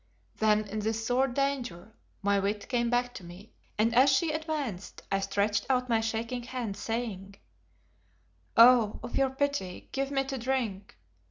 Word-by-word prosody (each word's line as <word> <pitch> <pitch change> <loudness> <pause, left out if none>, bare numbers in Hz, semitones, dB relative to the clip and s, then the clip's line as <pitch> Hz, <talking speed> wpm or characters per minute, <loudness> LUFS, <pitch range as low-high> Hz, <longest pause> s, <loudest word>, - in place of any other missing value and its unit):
Then 215 -1 +3
in 210 +2 -4
this 220 +1 -2
sore 255 +3 +2
danger 245 -8 -2 0.3
my 200 0 +3
wit 200 +1 -2
came 240 -2 +1
back 245 0 0
to - - -9
me 175 +5 -12 0.2
and 225 +2 +2
as 260 +3 +6
she 290 +4 +2
advanced 300 - -4
I 195 - +2
stretched 200 +1 0
out 250 -1 +1
my 225 -1 +3
shaking 230 +2 -2
hand, 240 -4 -4
saying 205 -3 -4 1.2
"Oh! 230 -2 +7
of 240 - -5
your 270 -1 +3
pity, 265 -9 -3
give 275 0 -1
me 270 -1 0
to 270 -1 -5
drink. 230 - -2
230 Hz, 160 wpm, -29 LUFS, 205-265 Hz, 1.2 s, Oh